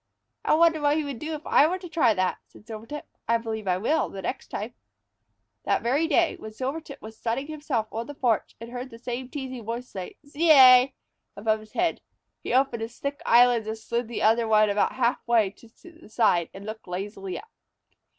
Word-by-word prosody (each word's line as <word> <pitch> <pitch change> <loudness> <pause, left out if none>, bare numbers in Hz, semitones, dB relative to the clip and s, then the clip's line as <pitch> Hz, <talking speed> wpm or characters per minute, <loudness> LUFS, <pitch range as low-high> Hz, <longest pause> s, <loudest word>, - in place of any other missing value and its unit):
"I - - +3
wonder 325 -1 +4
what 290 +1 +3
he 310 - 0
would 280 -5 -6
do 315 +1 -4
if 300 - -10
I 290 - +5
were 365 +3 -1
to 365 -1 -9
try 275 -10 +2
that?" 185 -1 0
said - - -18
Silvertip. 230 +6 -8 0.2
"I 230 +1 +3
believe 220 -2 -5
I 180 -1 +2
will 290 +10 0
the 195 -1 -8
next - - -4
time." 220 +4 -5 0.9
That - - 0
very 280 +7 +1
day, 335 +1 +2
when 220 - -8
Silvertip 275 +4 -5
was 220 +1 -9
sunning 240 +4 -2
himself 295 -7 -2
on 230 +2 -4
the 290 - -8
porch 235 -6 0
and 230 +1 -9
heard 250 +1 -6
the 230 - -11
same 245 +2 -5
teasing 260 -4 -6
voice 235 +3 -5
say, 185 -6 -7
"Zeay!" 275 -4 +7 0.4
above 215 +1 0
his 215 0 -16
head, 345 -1 0 0.4
he - - -5
opened 255 -2 +2
his 225 +1 -6
thick 280 0 -4
eyelids 240 -2 +5
and 220 0 -3
slid 235 +2 -3
the 235 - -4
other 225 +1 +3
ones 215 -1 +4
about 205 - +1
half 245 -1 +1
way 225 -5 +3
to 230 - -19 0.2
one 335 - -15
side, 195 -7 +2
and 195 +1 -11
looked 215 -1 -8
lazily 195 +1 -5
up. 455 +2 -12
235 Hz, 210 wpm, -26 LUFS, 220-285 Hz, 0.9 s, Zeay